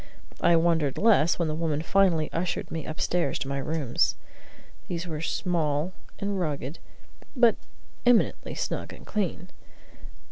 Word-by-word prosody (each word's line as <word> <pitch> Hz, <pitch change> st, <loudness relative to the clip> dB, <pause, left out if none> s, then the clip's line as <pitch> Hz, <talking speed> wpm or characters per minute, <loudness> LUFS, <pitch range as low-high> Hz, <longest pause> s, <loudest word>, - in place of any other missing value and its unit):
I 170 Hz, 0 st, +5 dB
wondered 165 Hz, -4 st, +2 dB
less 200 Hz, -7 st, +4 dB
when 170 Hz, -, 0 dB
the 155 Hz, -, -1 dB
woman 155 Hz, -1 st, -1 dB
finally 175 Hz, -4 st, +2 dB
ushered 170 Hz, +1 st, -2 dB
me 160 Hz, -2 st, -4 dB
upstairs 155 Hz, -1 st, 0 dB
to -, -, -4 dB
my 140 Hz, 0 st, -2 dB
rooms. 145 Hz, -3 st, 0 dB, 0.7 s
These 175 Hz, 0 st, -3 dB
were 155 Hz, -3 st, -4 dB
small 165 Hz, -1 st, 0 dB, 0.2 s
and 200 Hz, -1 st, -2 dB
rugged, 150 Hz, -3 st, -3 dB, 0.6 s
but 240 Hz, -3 st, +5 dB, 0.5 s
eminently 245 Hz, -2 st, +2 dB
snug -, -, -3 dB
and -, -, -13 dB
clean. 185 Hz, -3 st, -2 dB
165 Hz, 135 wpm, -27 LUFS, 155-180 Hz, 0.7 s, I